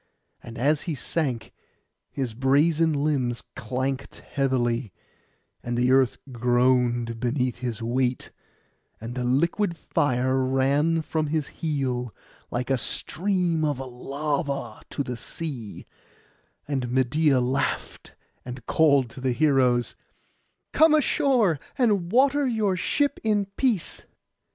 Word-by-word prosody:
And 120 -1 -10
as 145 +5 +2
he 160 - -1
sank, 130 -3 -2 0.6
his 130 -5 -3
brazen 150 +6 +3
limbs 140 -5 0
clanked 130 +3 -3
heavily, 125 -5 -1 0.7
and 120 0 -3
the 125 +1 +3
earth 130 -2 +4
groaned 120 -1 +2
beneath 125 +1 -1
his 120 -2 -4
weight; 125 +2 -1 0.7
and 115 +2 -6
the 125 0 -3
liquid 170 +8 +1
fire 130 -4 +1
ran 140 +5 +2
from 155 0 -1
his 155 -1 0
heel, 130 -6 -2 0.3
like 125 +2 -2
a 135 - +2
stream 175 - -1
of 145 -3 0
lava, 140 -1 -3
to 140 - -2
the 125 -2 -5
sea; 125 -5 -6 0.8
and 135 -4 -2
Medeia 130 +3 +2
laughed, 130 +2 -2 0.3
and 125 -1 -8
called 140 -5 +4
to 130 - -10
the 130 -1 +1
heroes, 130 -4 +2 0.8
'Come 315 0 +6
ashore, 250 - +2 0.2
and 205 -9 +2
water 275 +3 +4
your 215 -5 +1
ship 285 +10 0
in 210 -2 +2
peace. 235 -10 0
135 Hz, 115 wpm, -25 LUFS, 125-160 Hz, 0.8 s, Come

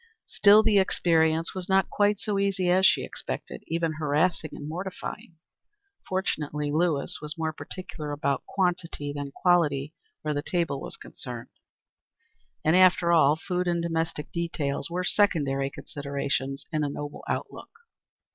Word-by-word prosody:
Still 210 +1 +6
the 215 -3 +4
experience 165 -3 +2
was 185 -1 -3
not 190 0 +3
quite 205 0 +2
so 205 -2 -1
easy 195 -2 +1
as 190 +2 +6
she - - +3
expected; - - -6
even 165 -1 0
harassing 155 +2 +1
and 145 - -7
mortifying. 180 0 -6 0.7
Fortunately, 150 -6 -1
Lewis 155 -2 0
was 150 +2 -5
more 160 -1 -1
particular 155 -3 -6
about 140 -1 -1
quantity 175 -6 -1
than 145 -1 -5
quality 155 -4 +2 0.3
where 155 -1 -1
the 145 - -1
table 165 -4 -1
was - - -7
concerned; 120 -2 -8 1.2
and, 160 +2 +4
after 180 -2 +5
all, 150 -3 +5
food 180 +2 -2
and 170 -1 +1
domestic 165 -2 -2
details 155 -4 -2
were 180 +2 -2
secondary 140 -10 +2
considerations 140 -1 -3
in 155 -2 0
a 145 - 0
noble 145 +1 -6
outlook. - - -4
165 Hz, 140 wpm, -27 LUFS, 145-180 Hz, 1.2 s, Still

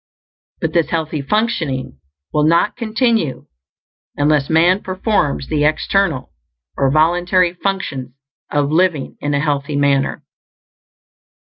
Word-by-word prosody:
But - - -1
this 170 -4 +2
healthy 155 -2 -2
functioning 140 - -1 0.3
will 150 - +2
not 170 +6 +2
continue 220 - 0 0.7
unless 145 -1 +2
man 175 +5 +4
performs 185 - -1
the 150 -2 0
external, 155 0 +1 0.4
or 135 - +2
voluntary, 175 +4 +2
functions 155 -10 -3 0.4
of 145 0 0
living 165 -3 +1
in 145 0 -1
a - - +1
healthy 145 -1 -1
manner. 140 -1 +1
155 Hz, 110 wpm, -18 LUFS, 140-185 Hz, 0.7 s, man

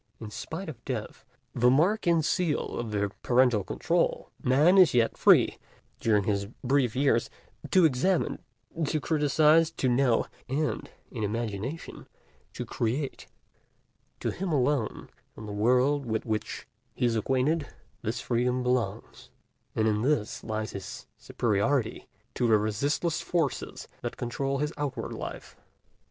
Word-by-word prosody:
In 110 -2 -8
spite 135 - -6
of 125 -7 -8
Death, 125 -5 -5 0.3
the 125 +1 +4
mark 175 - +3
and 165 -3 +3
seal 175 -5 0
of 120 -2 -3
the 100 -1 -1
parental 125 -4 +3
control, 90 - -1
Man 150 +9 +5
is 170 -9 +6
yet 115 -2 +3
free, - - +5 0.4
during 105 -3 +2
his 100 0 -1 0.2
brief 130 -3 +2
years, 130 -4 +2 0.4
to 185 -3 +5
examine, 160 +6 +1 0.5
to 155 - 0
criticize, 155 +1 +3
to 160 -5 -2
know, 125 -1 +3 0.2
and 150 +3 -1 0.2
in 115 - -5
imagination 115 +7 -4 0.5
to - - -5
create. 130 +5 -3 0.9
To - - -1
him 190 -1 -3
alone, 140 -4 0 0.3
in 110 - -8
the 105 - -6
world 125 +6 +2
with 110 -1 -1
which 110 -2 -3 0.3
he - - 0
is 115 -1 +2
acquainted, 135 +7 +1 0.3
this 115 +2 -3
freedom 125 +1 0
belongs; 125 -1 -2 0.5
and 110 0 +2
in 105 -1 +1
this 130 -4 0
lies 110 -1 -3
his 100 -1 -7
superiority 115 +3 -1 0.3
to 120 - +1
the 110 -2 +5
resistless 140 - 0
forces 165 -7 -2
that - - -5
control 135 +3 -2
his 150 +3 -2
outward 135 -5 -3
life. - - -7
125 Hz, 140 wpm, -28 LUFS, 110-150 Hz, 0.9 s, is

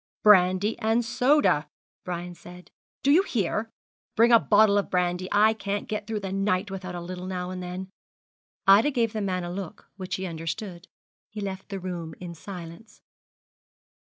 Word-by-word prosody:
'Brandy 195 +1 +5
and 225 +1 +1
soda,' 240 - +2 0.4
Brian 175 0 -4
said; 180 +1 -14 0.3
'do 280 - +4
you 330 +6 +6
hear? 225 - -1 0.5
Bring 230 +2 +5
a 230 - +8
bottle 205 -1 +4
of 200 - -3
brandy. 180 0 0
I 215 +2 +5
can't 205 -1 -4
get 210 -1 -4
through 220 -2 -3
the 195 -1 -4
night 195 0 0
without 185 -2 -6
a - - -4
little 180 +1 -6
now 180 -1 -4
and 185 0 -5
then.' 180 +1 -6 0.8
Ida 200 +8 +6
gave 235 -5 0
the 215 - -2
man 185 -2 -1
a 175 - -5
look 185 -2 -8
which 185 -2 -4
he 190 - -4
understood. 170 +2 -5 0.4
He 215 - -8
left 195 -1 -5
the 195 -2 -4
room 175 -4 -6
in 175 -1 -7
silence. 175 +4 -10
190 Hz, 170 wpm, -26 LUFS, 180-215 Hz, 0.8 s, a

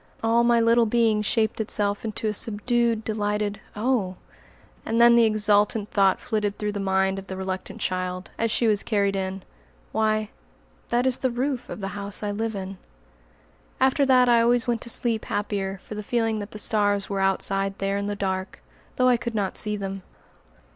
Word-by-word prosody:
All 230 +1 +3
my 235 0 +4
little 230 0 +4
being 225 -1 +2
shaped 220 +1 0
itself 205 -1 0
into 220 0 -4
a 210 - 0
subdued 230 +2 0
delighted 210 -1 -2
"Oh!" 210 -4 0 0.7
And 225 +1 -1
then 235 0 +7
the 235 -1 +6
exultant 210 0 +2
thought 195 -2 +3
flitted 210 -3 -2
through 210 0 -2
the 205 - -4
mind 190 0 +1
of 195 - -11
the 190 - -6
reluctant 190 0 -5
child, 185 0 -3
as 230 - 0
she 235 - +1
was 210 -2 +3
carried 200 -3 0
in, 190 0 -3 0.5
"Why, 215 -1 0 0.6
that 240 +1 +1
is 260 -1 +2
the 260 - +1
roof 250 +1 -2
of - - -7
the 195 - -3
house 200 +1 -5
I 205 - -1
live 220 +1 -3
in." 190 -1 -6 1.0
After 265 +2 +3
that 255 -1 +5
I 235 -1 +5
always 240 +1 +2
went 235 -2 -1
to - - -3
sleep 230 -1 0
happier 195 -2 -3
for - - -9
the 210 - -5
feeling 225 0 0
that 205 0 -6
the 215 - -9
stars 205 -2 +1
were 195 -1 -2
outside 195 0 0
there 195 0 -1
in 200 - -3
the 205 - -2
dark, 190 -1 -3 0.4
though 255 - +3
I 250 -1 +4
could 235 0 -5
not 200 -3 -1
see 210 -1 +1
them. 195 -1 -5
210 Hz, 190 wpm, -25 LUFS, 195-230 Hz, 1.0 s, then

